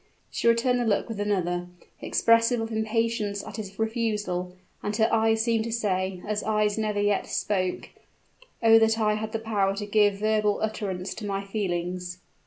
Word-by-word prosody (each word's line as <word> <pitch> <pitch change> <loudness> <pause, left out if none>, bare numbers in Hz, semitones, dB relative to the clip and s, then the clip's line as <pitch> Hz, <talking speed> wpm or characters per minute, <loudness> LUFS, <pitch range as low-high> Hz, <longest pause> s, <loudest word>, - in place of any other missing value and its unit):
She - - -1
returned 240 +2 +3
the - - +1
look 210 -3 +1
with 225 -3 -6
another, 180 -4 -1 0.3
expressive 230 +1 +3
of 225 0 -3
impatience 220 -2 -1
at - - -8
his 200 -2 -7
refusal: 210 -5 -2 0.3
and 205 - -2
her 220 0 +3
eyes 225 0 +3
seemed 230 -1 +1
to 230 - -4
say, 190 -5 -1
as 210 0 -1
eyes 210 -1 +1
never 215 -2 -1
yet 205 -1 +1
spoke, 185 -3 -1 0.7
"Oh, 225 0 +7
that 225 0 +3
I 210 -1 +2
had 215 +1 -3
the 225 - -1
power 205 -3 0
to 205 +1 -4
give 205 -1 +3
verbal 210 0 +1
utterance 200 -4 -3
to 210 - -6
my 195 0 -2
feelings!" 180 -3 -3
210 Hz, 175 wpm, -26 LUFS, 195-225 Hz, 0.7 s, Oh